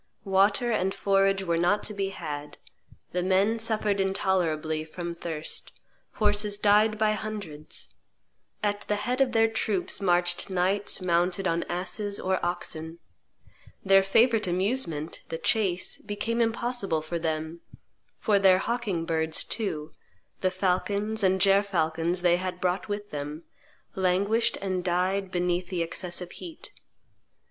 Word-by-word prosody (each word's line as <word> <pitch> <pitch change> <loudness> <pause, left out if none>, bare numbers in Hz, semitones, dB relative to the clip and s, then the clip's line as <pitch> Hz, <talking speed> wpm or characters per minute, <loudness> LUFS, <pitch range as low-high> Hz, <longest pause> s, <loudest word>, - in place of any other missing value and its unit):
Water 200 +5 +3
and 190 -3 0
forage 195 0 +2
were 170 -2 0
not 180 +5 +2
to 215 - -3
be 195 -1 -1
had; 150 -6 -6 0.5
the 180 - -1
men 195 +5 +2
suffered 215 -3 +1
intolerably 170 -5 0
from 170 +2 -6
thirst; 165 -2 -6 0.3
horses 205 -1 +2
died 210 +1 +4
by 215 0 +3
hundreds; 205 -9 -6 0.7
at 205 0 0
the 210 - -1
head 245 +6 -1
of 265 -2 +3
their 225 -1 +5
troops 210 -4 -1
marched 175 0 +2
knights 190 +2 0
mounted 180 +2 +1
on 165 +1 +1
asses 200 +3 -2
or 190 0 -1
oxen; 165 -2 -3 0.9
their 195 0 +7
favorite 225 +2 +4
amusement, 180 - -1
the 165 - -3
chase, 185 -2 0
became 220 +3 -2
impossible 225 -8 0
for 170 +2 -3
them; 160 +1 -3 0.6
for 205 -2 +2
their 190 -1 +6
hawking 205 -6 -2
birds 160 -1 +1
too 170 -9 -3 0.5
the 185 - +2
falcons 200 +3 0
and 190 0 +3
gerfalcons 180 -3 +2
they 175 -1 +4
had 180 0 -4
brought 180 +1 -1
with 205 0 -4
them 150 +2 -5 0.5
languished 195 +5 +1
and 185 -2 -1
died 185 +2 0
beneath 180 0 0
the 175 -2 -1
excessive 175 +1 -4
heat. 335 -3 -9
190 Hz, 135 wpm, -27 LUFS, 175-205 Hz, 0.9 s, their